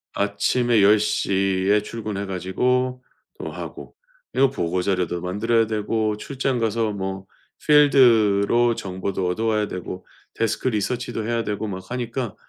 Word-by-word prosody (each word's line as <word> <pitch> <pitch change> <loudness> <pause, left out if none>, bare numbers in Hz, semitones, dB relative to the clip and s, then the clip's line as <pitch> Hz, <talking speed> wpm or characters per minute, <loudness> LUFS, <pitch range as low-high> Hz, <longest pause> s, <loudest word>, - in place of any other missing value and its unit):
아침에 105 +3 +1
10 100 -2 +2
에 105 0 +4
출근해 105 -2 -5
가지고 125 +8 -1 0.4
또 - - -5
하고, - - -9 0.4
이거 135 -1 +4
보고 90 -7 -2
자료도 90 -2 -1
만들어야 115 +5 +1
되고, 110 0 -1
출장 135 0 -2
가서 115 -1 0
뭐 95 -1 -5 0.4
필드로 120 -6 +5
정보도 95 -1 -3
얻어 110 +6 -1
와야 105 -2 +1
되고, 90 0 -7 0.3
데스크 115 +3 -1
리서치도 115 +1 -2
해야 115 -1 0
되고 105 +1 -3
막 95 -1 -7
하니까 120 -2 -4
105 Hz, 280 characters per minute, -23 LUFS, 95-120 Hz, 0.4 s, 필드로